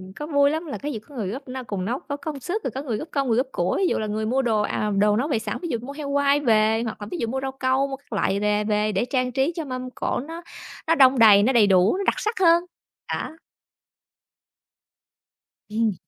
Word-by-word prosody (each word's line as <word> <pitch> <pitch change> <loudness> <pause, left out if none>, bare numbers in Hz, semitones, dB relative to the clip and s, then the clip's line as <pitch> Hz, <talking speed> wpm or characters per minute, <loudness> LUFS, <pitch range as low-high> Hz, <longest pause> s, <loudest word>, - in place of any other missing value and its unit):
có 295 - -6
vui 285 -2 +3
lắm 315 +3 -2
là 295 - -5
cái 295 +1 -4
gì 225 - -4
có 280 +7 -17
người 220 -6 -3
góp 265 +8 -6
n - - -6
cùng 190 -3 -3
nấu, 245 +6 -2
có 285 0 -6
công 300 -2 -6
sức, 365 +9 -3
rồi - - -2
có 265 - -5
người 235 -7 -2
góp 310 - -6
công, 275 -2 0
người 230 -1 +2
góp 255 - +1
của. 175 - -1
Ví 380 - +2
dụ - - 0
là 215 - -2
người 215 +1 -2
mua 255 +5 +1
đồ, 225 -4 +1
à, 210 0 -1
đồ 205 +1 +4
nấu 265 - 0
về 275 -8 0
sẵn, 215 -1 -4
ví 345 - -4
dụ 235 - 0
mua 275 +3 -8
heo 290 -1 -6
quay 285 0 +3
về, 220 -3 +3
hoặc 225 -2 -6
là 205 - -6
ví 355 - -3
dụ 230 - -2
mua 265 +3 -3
rau 270 0 -3
câu, 265 +1 0
mua 270 - -4
các 270 -3 -13
loại 200 -1 0
về 210 0 +1
về 210 0 0
để 200 +4 0
trang 255 0 -1
trí 270 +5 +1
cho 325 - -4
mâm 255 -1 -5
cỗ - - -2
nó 330 +1 -7 0.5
nó 330 - +4
đong 265 -3 +5
đầy, 205 -3 +7
nó 260 - +2
đầy 220 -4 +5
đủ, 190 - +4
nó 400 - -2
đặc - - +2
sắc 435 -4 -2
hơn, 340 -1 +5 0.5
đó. - - -3 2.4
Ừm. 220 -1 +1
255 Hz, 265 wpm, -24 LUFS, 215-285 Hz, 2.4 s, đầy